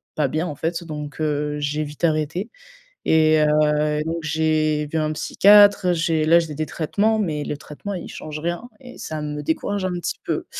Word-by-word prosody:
pas 150 Hz, -3 st, +1 dB
bien 155 Hz, +5 st, -1 dB
en 150 Hz, -, -5 dB
fait. 165 Hz, +3 st, -3 dB
Donc, 150 Hz, -3 st, -7 dB
heu, 150 Hz, -1 st, -1 dB
j'ai 145 Hz, +1 st, -1 dB
vite 150 Hz, +3 st, -10 dB
arrêté. 160 Hz, +6 st, -1 dB, 0.6 s
Et 155 Hz, -1 st, +4 dB
heu, 150 Hz, 0 st, +2 dB
donc 165 Hz, +1 st, -2 dB
j'ai 155 Hz, 0 st, +1 dB
vu 160 Hz, -, -1 dB
un 155 Hz, 0 st, 0 dB
psychiatre, 200 Hz, +3 st, +5 dB
j'ai 165 Hz, -2 st, +1 dB
là, 170 Hz, +2 st, +6 dB
j'ai 160 Hz, -3 st, -4 dB
des 155 Hz, +1 st, -2 dB
traitements, 210 Hz, +9 st, 0 dB
mais 155 Hz, -7 st, -1 dB
le 150 Hz, -, -3 dB
traitement, 155 Hz, +7 st, -8 dB
il 180 Hz, -, -6 dB
change 155 Hz, 0 st, -7 dB
rien 175 Hz, +9 st, -3 dB
et 250 Hz, -1 st, -12 dB
ça 155 Hz, -1 st, -5 dB
me 150 Hz, 0 st, -4 dB
décourage 190 Hz, +5 st, -1 dB
un 185 Hz, -, -1 dB
petit 175 Hz, -, -4 dB
peu. -, -, -2 dB
155 Hz, 190 wpm, -22 LUFS, 150-170 Hz, 0.6 s, là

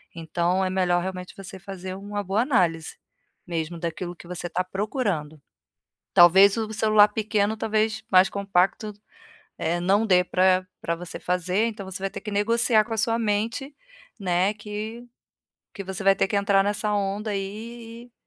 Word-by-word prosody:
Então, 170 Hz, +3 st, 0 dB
é -, -, -1 dB
melhor 180 Hz, -2 st, +1 dB
realmente 185 Hz, 0 st, -6 dB
você 190 Hz, -1 st, -8 dB
fazer 185 Hz, -1 st, -7 dB
uma 205 Hz, +1 st, -5 dB
boa 195 Hz, +4 st, 0 dB
análise, 175 Hz, -, 0 dB, 0.5 s
mesmo, 170 Hz, 0 st, -4 dB
daquilo 175 Hz, +1 st, -4 dB
que 170 Hz, -, -14 dB
você 175 Hz, 0 st, -5 dB
tá 185 Hz, -, -1 dB
procurando. 185 Hz, -, -3 dB, 0.7 s
Talvez 190 Hz, +4 st, +7 dB
o 220 Hz, -1 st, -3 dB
celular 215 Hz, -1 st, +5 dB
pequeno, 210 Hz, 0 st, 0 dB
talvez, 220 Hz, 0 st, -1 dB
mais 185 Hz, 0 st, +6 dB
compacto, 200 Hz, +1 st, 0 dB, 0.7 s
eh, 170 Hz, +2 st, -1 dB
não 195 Hz, +5 st, +2 dB
dê 180 Hz, -2 st, +5 dB
pra 185 Hz, 0 st, +2 dB, 0.2 s
pra 170 Hz, -, -1 dB
você 175 Hz, 0 st, -8 dB
fazer, 180 Hz, +4 st, 0 dB
então, 210 Hz, -4 st, -6 dB
você 190 Hz, 0 st, -7 dB
vai 195 Hz, -, 0 dB
ter -, -, -8 dB
que 210 Hz, -, -6 dB
negociar 220 Hz, +2 st, +3 dB
com 230 Hz, -, -5 dB
a 225 Hz, -, -3 dB
sua 230 Hz, +1 st, +1 dB
mente, 230 Hz, +6 st, -2 dB, 0.4 s
né, 185 Hz, +1 st, +1 dB
que 215 Hz, +3 st, -7 dB, 0.7 s
que 195 Hz, -, -6 dB
você 190 Hz, +1 st, -5 dB
vai 195 Hz, 0 st, +6 dB
ter -, -, +2 dB
que -, -, -4 dB
entrar 200 Hz, -1 st, +3 dB
nessa 210 Hz, +1 st, -1 dB
onda 205 Hz, +1 st, -1 dB
aí 225 Hz, +4 st, -6 dB
e 245 Hz, -, -27 dB
195 Hz, 170 wpm, -25 LUFS, 180-215 Hz, 0.7 s, Talvez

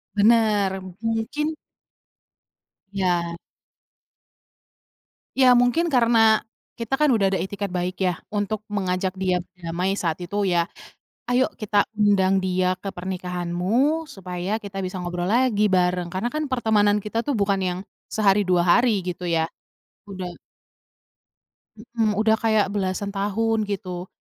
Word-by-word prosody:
Bener. 205 Hz, -3 st, +3 dB, 0.2 s
Mungkin 225 Hz, +7 st, -1 dB, 1.4 s
Ya. 175 Hz, -3 st, 0 dB, 2.0 s
Ya, 260 Hz, -1 st, +6 dB
mungkin 280 Hz, +8 st, +2 dB
karena 230 Hz, -3 st, +4 dB, 0.3 s
kita 230 Hz, +2 st, -5 dB
kan 300 Hz, +2 st, +3 dB
udah 200 Hz, -6 st, +2 dB
ada -, -, +1 dB
itikad 200 Hz, 0 st, -4 dB
baik 180 Hz, +1 st, -2 dB
ya, 180 Hz, -2 st, -1 dB
untuk 205 Hz, 0 st, -2 dB
mengajak 190 Hz, -1 st, -1 dB
dia 185 Hz, -1 st, 0 dB
berdamai 180 Hz, +2 st, -3 dB
saat 165 Hz, -2 st, -2 dB
itu 200 Hz, +3 st, -2 dB
ya. 170 Hz, -2 st, +1 dB, 0.6 s
"Ayo 250 Hz, +1 st, +3 dB
kita 205 Hz, -1 st, +1 dB
undang 195 Hz, -2 st, +3 dB
dia 185 Hz, 0 st, +1 dB
ke 195 Hz, -, -3 dB
pernikahanmu, 185 Hz, -, -1 dB
supaya 195 Hz, -, -4 dB
kita 200 Hz, -2 st, -7 dB
bisa 185 Hz, 0 st, -4 dB
ngobrol 175 Hz, 0 st, -3 dB
lagi, 230 Hz, -3 st, +3 dB
bareng." 180 Hz, -1 st, +1 dB
Karena 190 Hz, +6 st, -1 dB
kan 305 Hz, 0 st, -1 dB
pertemanan 215 Hz, -4 st, +2 dB
kita 225 Hz, +3 st, -3 dB
tuh 290 Hz, -, +1 dB
bukan 200 Hz, -1 st, +1 dB
yang 180 Hz, -1 st, -1 dB, 0.3 s
sehari, 205 Hz, -1 st, +3 dB
2 180 Hz, -2 st, +2 dB
hari 220 Hz, +3 st, +4 dB
gitu 180 Hz, 0 st, -4 dB
ya, 165 Hz, -2 st, +1 dB, 0.6 s
udah 190 Hz, -2 st, -6 dB, 1.5 s
Mhm, 225 Hz, -1 st, -1 dB
udah 220 Hz, 0 st, +4 dB
kayak 220 Hz, -2 st, +3 dB
belasan 200 Hz, 0 st, -2 dB
tahun, 215 Hz, +2 st, 0 dB
gitu. 185 Hz, -3 st, -5 dB
200 Hz, 125 wpm, -23 LUFS, 180-220 Hz, 2.0 s, Ya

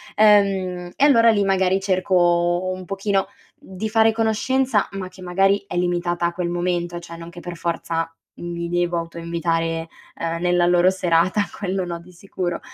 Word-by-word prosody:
Ehm, 195 Hz, -4 st, +3 dB
e 280 Hz, -, +3 dB
allora 230 Hz, -5 st, +6 dB
lì 205 Hz, -2 st, +2 dB
magari 190 Hz, -1 st, +2 dB
cerco 180 Hz, -2 st, +2 dB
un 185 Hz, 0 st, -8 dB
pochino 195 Hz, 0 st, 0 dB, 0.3 s
di 190 Hz, +3 st, -6 dB
fare 225 Hz, 0 st, +4 dB
conoscenza 225 Hz, +1 st, +1 dB
ma 195 Hz, -1 st, -5 dB
che 185 Hz, 0 st, -16 dB
magari 195 Hz, +3 st, +2 dB
è -, -, -6 dB
limitata 175 Hz, -1 st, 0 dB
a 170 Hz, -, -4 dB
quel 175 Hz, -1 st, -2 dB
momento, 175 Hz, 0 st, -2 dB
cioè 170 Hz, -1 st, -10 dB
non 165 Hz, 0 st, -10 dB
che 175 Hz, -, -10 dB
per 175 Hz, 0 st, -7 dB
forza 165 Hz, -1 st, -2 dB, 0.3 s
mi 170 Hz, 0 st, -5 dB
devo 175 Hz, 0 st, 0 dB
autoinvitare, 165 Hz, 0 st, -2 dB, 0.3 s
ehm, 165 Hz, 0 st, -3 dB
nella 175 Hz, 0 st, +2 dB
loro 175 Hz, +1 st, +4 dB
serata 180 Hz, +1 st, +1 dB, 0.2 s
quello 190 Hz, -2 st, -2 dB
no 170 Hz, -1 st, -5 dB
di 180 Hz, +2 st, -16 dB
sicuro. 175 Hz, -1 st, -4 dB
180 Hz, 165 wpm, -22 LUFS, 170-195 Hz, 0.3 s, allora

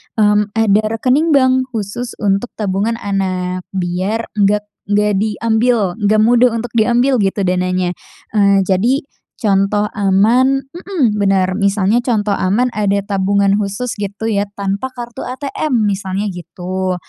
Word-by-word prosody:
mmm, 210 Hz, -1 st, +2 dB
ada 215 Hz, -1 st, +3 dB
rekening 285 Hz, +7 st, +2 dB
bank 260 Hz, -1 st, +3 dB
khusus 220 Hz, +3 st, -4 dB
untuk 200 Hz, +3 st, 0 dB
tabungan 205 Hz, +2 st, -1 dB
anak 185 Hz, -3 st, -3 dB
biar 185 Hz, +5 st, -2 dB
nggak 205 Hz, +1 st, +3 dB, 0.2 s
nggak 210 Hz, 0 st, +2 dB
diambil, 220 Hz, -1 st, 0 dB
nggak 215 Hz, +1 st, +3 dB
mudah 240 Hz, +2 st, +4 dB
untuk 230 Hz, +1 st, -4 dB
diambil 245 Hz, +3 st, +2 dB
gitu 195 Hz, 0 st, 0 dB
dananya, 185 Hz, 0 st, 0 dB, 0.4 s
eee, 200 Hz, -2 st, +3 dB
jadi, 205 Hz, +9 st, +1 dB, 0.3 s
contoh 205 Hz, 0 st, +1 dB
aman 235 Hz, +8 st, +3 dB
mhm, 345 Hz, -, -1 dB
bener, 190 Hz, -1 st, +1 dB
misalnya 200 Hz, +2 st, +2 dB
contoh 220 Hz, -4 st, 0 dB
aman 210 Hz, +6 st, +1 dB
ada 200 Hz, -2 st, 0 dB
tabungan 200 Hz, 0 st, +1 dB
khusus 210 Hz, +4 st, -3 dB
gitu 205 Hz, +2 st, -3 dB
ya 205 Hz, 0 st, 0 dB
tanpa 200 Hz, +6 st, -3 dB
kartu 240 Hz, -1 st, -7 dB
ATM 275 Hz, +2 st, -3 dB, 0.2 s
misalnya 195 Hz, +1 st, -3 dB
gitu, 185 Hz, +1 st, -4 dB
205 Hz, 130 wpm, -16 LUFS, 195-235 Hz, 0.4 s, mudah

